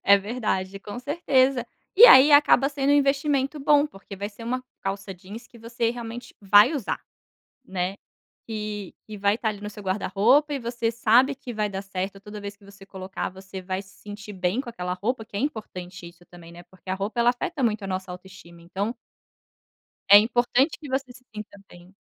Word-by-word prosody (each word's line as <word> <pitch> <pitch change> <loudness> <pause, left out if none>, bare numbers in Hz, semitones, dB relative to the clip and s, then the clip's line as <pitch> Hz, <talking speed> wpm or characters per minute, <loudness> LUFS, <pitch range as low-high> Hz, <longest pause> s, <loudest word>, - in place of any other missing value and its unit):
É 200 0 +7
verdade, 200 -3 -3
com 205 +3 -8
certeza. 270 -2 +1 0.3
E 460 - +10
aí, 290 - +9
acaba 285 -1 +6
sendo 280 -1 -1
um - - +5
investimento 280 0 +1
bom 290 +1 +4
porque 200 -7 -12
vai 200 +2 -4
ser 215 +2 -14
uma 255 +2 -2 0.2
calça 195 0 -4
jeans 205 +7 -11
que 235 - -17
você 230 0 -2
realmente 235 0 -8
vai 205 +8 +6
usar. 255 -8 -3 0.6
Né. 190 -3 -3 0.5
E 210 -3 -5
e 215 - -7
vai 200 +1 +1
estar 230 -1 -2
ali 205 -2 -4
no 210 - -5
seu 210 0 -11
guarda-roupa 210 +9 +2
e - - -2
você 235 -2 -2
sabe 235 +4 +3
que 255 -3 -9
vai 210 -1 -1
dar 195 0 -5
certo, 195 0 -5
toda 210 +1 -9
vez 200 0 -7
que 205 - -22
você 200 0 -15
colocar, 190 -1 -6
você 190 0 -10
vai 185 +1 -3
se 190 - -19
sentir 205 0 -9
bem 185 +6 -1
com 260 - -9
aquela 180 -5 -4
roupa, 220 +5 -3
que 205 - -10
é - - -1
importante 185 - -5
isso 175 +1 -19
também, 170 -1 -14
né, 175 +1 -12
porque 190 +1 -12
a - - +1
roupa, 205 +4 -3
ela 235 - +5
afeta 315 +4 -4
muito 220 -3 0
a - - -4
nossa 185 -1 -4
autoestima, 180 -2 -12
então 195 +7 -3 1.1
é 205 - +11
importante 245 +5 +1
que 295 - -9
você 260 -1 -3
se 250 +1 -18
sinta 210 -1 -9
bem. 175 +2 -17
210 Hz, 200 wpm, -25 LUFS, 195-250 Hz, 1.1 s, é